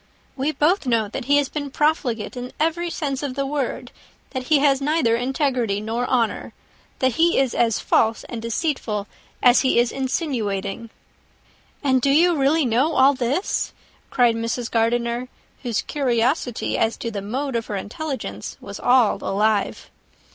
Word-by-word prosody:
We 275 Hz, +3 st, 0 dB
both 310 Hz, +1 st, +1 dB
know 225 Hz, -4 st, +1 dB
that 245 Hz, +4 st, -5 dB
he 285 Hz, +2 st, +4 dB
has 290 Hz, -1 st, +2 dB
been 285 Hz, 0 st, -4 dB
profligate 270 Hz, -7 st, 0 dB
in 250 Hz, 0 st, -6 dB
every 330 Hz, +2 st, 0 dB
sense 280 Hz, -5 st, -3 dB
of 275 Hz, -3 st, -4 dB
the 275 Hz, 0 st, -1 dB
word; 275 Hz, -1 st, -3 dB, 0.4 s
that 260 Hz, -2 st, -4 dB
he 305 Hz, +3 st, +4 dB
has 275 Hz, -1 st, +3 dB
neither 290 Hz, -5 st, +2 dB
integrity 250 Hz, -4 st, 0 dB
nor 230 Hz, +3 st, -2 dB
honour; 235 Hz, -4 st, 0 dB, 0.4 s
that 260 Hz, 0 st, +2 dB
he 340 Hz, +1 st, +3 dB
is 265 Hz, -3 st, +2 dB
as 230 Hz, -2 st, +2 dB
false 225 Hz, 0 st, +1 dB
and 235 Hz, -2 st, -7 dB
deceitful 230 Hz, -4 st, -2 dB, 0.4 s
as 245 Hz, 0 st, +6 dB
he 260 Hz, -, +2 dB
is 240 Hz, 0 st, +3 dB
insinuating." 230 Hz, -, -2 dB, 0.9 s
"And 260 Hz, -2 st, +3 dB
do 275 Hz, -, +2 dB
you 335 Hz, +5 st, +4 dB
really 290 Hz, +2 st, +2 dB
know 255 Hz, +7 st, +2 dB
all 270 Hz, +2 st, +5 dB
this?" 265 Hz, -, -1 dB, 0.4 s
cried 240 Hz, -3 st, +3 dB
Mrs. 230 Hz, +1 st, -3 dB
Gardiner, 235 Hz, +2 st, 0 dB, 0.3 s
whose 235 Hz, -4 st, -1 dB
curiosity 250 Hz, -2 st, 0 dB
as 225 Hz, 0 st, +1 dB
to 230 Hz, -, -4 dB
the 205 Hz, -2 st, -4 dB
mode 255 Hz, +6 st, -3 dB
of 230 Hz, -1 st, -2 dB
her 210 Hz, -, -3 dB
intelligence 265 Hz, +9 st, -5 dB
was -, -, -8 dB
all 245 Hz, -3 st, +4 dB
alive. 210 Hz, +1 st, 0 dB
255 Hz, 160 wpm, -22 LUFS, 230-285 Hz, 0.9 s, as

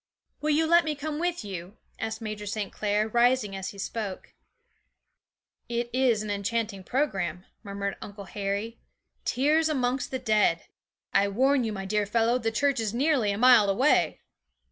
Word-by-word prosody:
'Will 305 Hz, -, -1 dB
you 310 Hz, +2 st, +3 dB
let 340 Hz, +1 st, +5 dB
me 310 Hz, -2 st, -2 dB
come 295 Hz, +1 st, -4 dB
with 350 Hz, -7 st, -2 dB
you?' 190 Hz, 0 st, -7 dB, 0.2 s
asked 220 Hz, +1 st, -4 dB
Major 215 Hz, -1 st, -5 dB
St. 205 Hz, -1 st, -3 dB
Clair, 210 Hz, 0 st, 0 dB
rising 235 Hz, -2 st, +2 dB
as 190 Hz, -1 st, -4 dB
he 200 Hz, -, -11 dB
spoke. 200 Hz, -1 st, -5 dB, 1.4 s
'It 235 Hz, 0 st, -2 dB
is 245 Hz, -4 st, +2 dB
an 210 Hz, -, -4 dB
enchanting 205 Hz, 0 st, -2 dB
programme,' 190 Hz, -, -1 dB, 0.2 s
murmured 200 Hz, -1 st, -4 dB
Uncle 205 Hz, 0 st, -8 dB
Harry; 200 Hz, +4 st, -4 dB, 0.5 s
'tears 305 Hz, +5 st, +2 dB
amongst 255 Hz, -3 st, 0 dB
the 260 Hz, -, -2 dB
dead! 215 Hz, -8 st, +2 dB, 0.5 s
I 200 Hz, 0 st, +4 dB
warn 260 Hz, +6 st, +2 dB
you, 225 Hz, -, -2 dB
my 195 Hz, -2 st, -5 dB
dear 210 Hz, +1 st, 0 dB
fellow, 230 Hz, +3 st, +2 dB
the 225 Hz, -2 st, 0 dB
church 280 Hz, +3 st, +1 dB
is 220 Hz, 0 st, -2 dB
nearly 270 Hz, -4 st, +2 dB
a 200 Hz, -, -2 dB
mile 240 Hz, -3 st, +6 dB
away.' 255 Hz, +10 st, +2 dB
225 Hz, 165 wpm, -27 LUFS, 200-260 Hz, 1.4 s, mile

